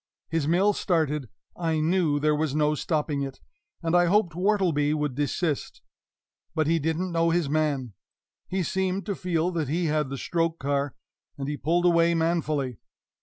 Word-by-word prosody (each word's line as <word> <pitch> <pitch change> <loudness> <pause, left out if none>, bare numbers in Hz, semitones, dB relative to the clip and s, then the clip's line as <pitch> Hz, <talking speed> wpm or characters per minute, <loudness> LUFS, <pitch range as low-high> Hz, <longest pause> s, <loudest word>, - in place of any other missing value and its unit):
His 165 -2 0
mill 190 +6 +3
started, 150 - 0 0.3
I 165 -2 0
knew 160 -2 +2
there 150 +1 +2
was 150 -2 -1
no 150 0 +3
stopping 150 -2 -1
it, 135 -1 -5 0.4
and 165 +1 +1
I 175 0 +5
hoped 180 -2 +2
Wortleby 175 -6 +2
would 150 -3 -1
desist. 145 +2 -2 0.7
But 160 -2 +2
he 165 +2 +2
didn't 160 +4 -1
know 165 0 +2
his 170 -2 +1
man. 145 -7 0 0.5
He 190 0 -1
seemed 190 +2 -1
to 205 - -1
feel 180 -2 -1
that 160 -6 -2
he 170 +4 0
had 150 -3 0
the 135 - -4
stroke 165 +2 -1
car, 140 -1 -1 0.4
and 135 -1 -4
he 145 - -2
pulled 170 +5 +1
away 170 -1 +4
manfully. 155 -7 0
160 Hz, 170 wpm, -26 LUFS, 150-175 Hz, 0.7 s, I